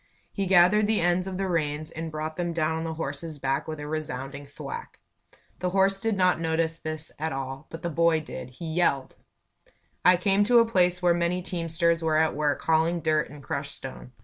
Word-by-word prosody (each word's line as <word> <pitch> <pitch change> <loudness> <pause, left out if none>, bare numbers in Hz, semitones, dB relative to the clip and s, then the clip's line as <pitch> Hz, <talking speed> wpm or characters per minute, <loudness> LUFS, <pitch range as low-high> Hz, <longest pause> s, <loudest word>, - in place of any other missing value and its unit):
He 195 -2 -1
gathered 195 +3 +5
the 220 0 +2
ends 175 +2 +1
of 185 -1 -4
the 195 0 -1
reins 155 -2 -1
and 160 0 -5
brought 155 +1 -4
them 175 0 -2
down 160 -1 0
on 160 - -3
the 160 -1 -3
horse's 155 +1 -5
back 135 +2 -1
with 155 -1 -5
a 150 - -5
resounding 140 -2 -4
thwack. 465 - -8 0.6
The 180 - 0
horse 195 +1 +2
did 225 -3 0
not 185 -2 +3
notice 165 0 0
this 155 -1 -5
at 160 +1 -2
all, 135 +2 -5
but 165 0 -9
the 170 - -2
boy 165 0 +3
did. 150 -4 -8
He 125 +7 -9
yelled! 150 -6 +1 0.9
I 180 0 +6
came 195 +2 +3
to 240 +2 +5
a 230 - +7
place 180 -4 +2
where 175 -1 +5
many 175 +1 0
teamsters 170 -1 0
were 160 -1 +2
at 160 0 +3
work 145 0 0
hauling 165 +1 +2
dirt 155 -1 +1
and 150 -1 -12
crushed - - -3
stone. 65 -1 -8
165 Hz, 205 wpm, -27 LUFS, 155-180 Hz, 0.9 s, a